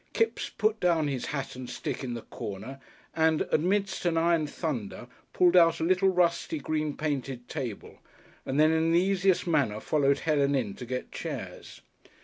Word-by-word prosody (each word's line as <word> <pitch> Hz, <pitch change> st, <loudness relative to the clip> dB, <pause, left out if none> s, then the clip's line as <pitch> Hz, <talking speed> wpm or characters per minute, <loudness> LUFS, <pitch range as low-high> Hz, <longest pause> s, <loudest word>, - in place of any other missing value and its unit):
Kipps 455 Hz, -, 0 dB
put 215 Hz, 0 st, 0 dB
down 165 Hz, -4 st, +2 dB
his 135 Hz, -3 st, -3 dB
hat 140 Hz, -3 st, -4 dB
and 125 Hz, -1 st, -7 dB
stick -, -, -4 dB
in 120 Hz, -2 st, -3 dB
the 115 Hz, -, -7 dB
corner 110 Hz, +7 st, -7 dB, 0.4 s
and, 160 Hz, -1 st, +3 dB
amidst 195 Hz, +4 st, +1 dB
an 170 Hz, -2 st, +1 dB
iron 165 Hz, -2 st, +2 dB
thunder, 135 Hz, -, -4 dB, 0.3 s
pulled 180 Hz, 0 st, +4 dB
out 165 Hz, -2 st, +6 dB
a -, -, -1 dB
little, 185 Hz, +3 st, +3 dB
rusty, 170 Hz, -3 st, +1 dB
green 155 Hz, 0 st, -2 dB
painted 135 Hz, -5 st, -3 dB
table, 120 Hz, -6 st, -6 dB, 0.4 s
and 135 Hz, +2 st, -2 dB
then 155 Hz, +1 st, +5 dB
in 160 Hz, 0 st, +2 dB
the 170 Hz, -, +5 dB
easiest 190 Hz, 0 st, +2 dB
manner 140 Hz, -11 st, +1 dB
followed 140 Hz, +2 st, +2 dB
Helen 145 Hz, -3 st, +2 dB
in 115 Hz, -7 st, -1 dB
to 125 Hz, -, -9 dB
get 125 Hz, +1 st, -4 dB
chairs. -, -, -7 dB
155 Hz, 170 wpm, -28 LUFS, 135-170 Hz, 0.4 s, out